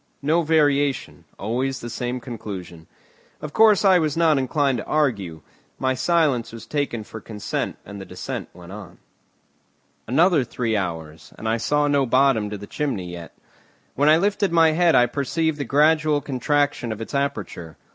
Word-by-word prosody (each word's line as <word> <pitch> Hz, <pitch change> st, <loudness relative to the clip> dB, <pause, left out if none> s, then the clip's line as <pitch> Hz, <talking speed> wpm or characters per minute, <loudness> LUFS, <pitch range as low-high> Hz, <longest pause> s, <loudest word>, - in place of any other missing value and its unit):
No 160 Hz, +4 st, +2 dB
variation, 145 Hz, -3 st, +1 dB
always 130 Hz, +6 st, -2 dB
the 120 Hz, -, -7 dB
same 125 Hz, +2 st, -3 dB
conclusion. 100 Hz, -9 st, -8 dB, 0.5 s
Of 150 Hz, -1 st, -7 dB
course, 215 Hz, -2 st, +5 dB
I 190 Hz, -2 st, +6 dB
was 155 Hz, -1 st, -1 dB
not 160 Hz, -4 st, +4 dB
inclined 135 Hz, -1 st, 0 dB
to -, -, -6 dB
argue. 100 Hz, -, -1 dB, 0.4 s
My 130 Hz, 0 st, 0 dB
silence 140 Hz, -3 st, +1 dB
was 115 Hz, 0 st, -10 dB
taken 140 Hz, -7 st, -2 dB
for 110 Hz, +1 st, -10 dB
consent 105 Hz, -1 st, -4 dB
and 100 Hz, 0 st, -9 dB
the -, -, -8 dB
descent 90 Hz, 0 st, -6 dB
went 90 Hz, 0 st, -13 dB
on. 100 Hz, -4 st, -10 dB, 1.1 s
Another 160 Hz, -, +3 dB
three 115 Hz, -2 st, -2 dB
hours, 80 Hz, -5 st, -5 dB
and 110 Hz, -, -6 dB
I 110 Hz, +1 st, +1 dB
saw 145 Hz, +5 st, +1 dB
no 140 Hz, -2 st, +2 dB
bottom 130 Hz, -4 st, +3 dB
to 105 Hz, -, -5 dB
the 100 Hz, -, -9 dB
chimney 100 Hz, -10 st, -3 dB
yet. 85 Hz, -1 st, -10 dB, 0.6 s
When 145 Hz, +3 st, +3 dB
I 155 Hz, -, +6 dB
lifted 200 Hz, +1 st, +1 dB
my 165 Hz, -1 st, +5 dB
head 170 Hz, +1 st, +3 dB
I 120 Hz, -, +6 dB
perceived 150 Hz, +5 st, -1 dB
the 140 Hz, -, -2 dB
gradual 150 Hz, +2 st, +3 dB
contraction 145 Hz, -2 st, -1 dB
of 110 Hz, -, -5 dB
its 115 Hz, -, -7 dB
aperture. 105 Hz, -, -3 dB
130 Hz, 165 wpm, -23 LUFS, 110-150 Hz, 1.1 s, I